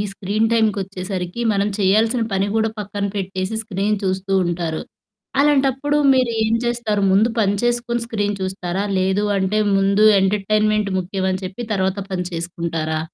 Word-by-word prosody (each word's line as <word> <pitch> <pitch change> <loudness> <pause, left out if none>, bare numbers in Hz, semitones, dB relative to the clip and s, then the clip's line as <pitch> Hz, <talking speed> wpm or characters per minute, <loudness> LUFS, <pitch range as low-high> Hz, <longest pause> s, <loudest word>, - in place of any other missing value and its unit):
ఈ - - +1
స్క్రీన్ 205 +3 0
టైమ్‌కొచ్చేసరికి 195 -2 -1
మనం 200 0 +1
చేయాల్సిన 220 +5 +2
పని 195 +1 +1
కూడా 220 0 +2
పక్కన 200 0 -3
పెట్టేసి 190 +1 -3
స్క్రీన్ 205 +1 -1
చూస్తూ 190 +1 -2
ఉంటారు. 170 -2 -2 0.6
అలాంటప్పుడు 285 0 +2 0.2
మీరు 255 -2 +2
ఏం 220 +1 +1
చేస్తారు? 230 -4 0
ముందు 210 +4 +4
పని 200 -1 +2
చేసుకొని 240 0 0
స్క్రీన్ 205 -3 -2
చూస్తారా? 185 0 -3
లేదు 190 +2 +1
అంటే 195 +3 0 0.2
ముందు 195 +2 +3 0.2
ఎంటర్టైన్మెంట్ 210 +1 +1
ముఖ్యం 190 +1 -2
అని 185 - -4
చెప్పి 195 +6 -5
తర్వాత 190 0 0
పని 180 -1 -2
చేసుకుంటారా? 165 -2 -3
200 Hz, 140 wpm, -20 LUFS, 190-220 Hz, 0.6 s, ముందు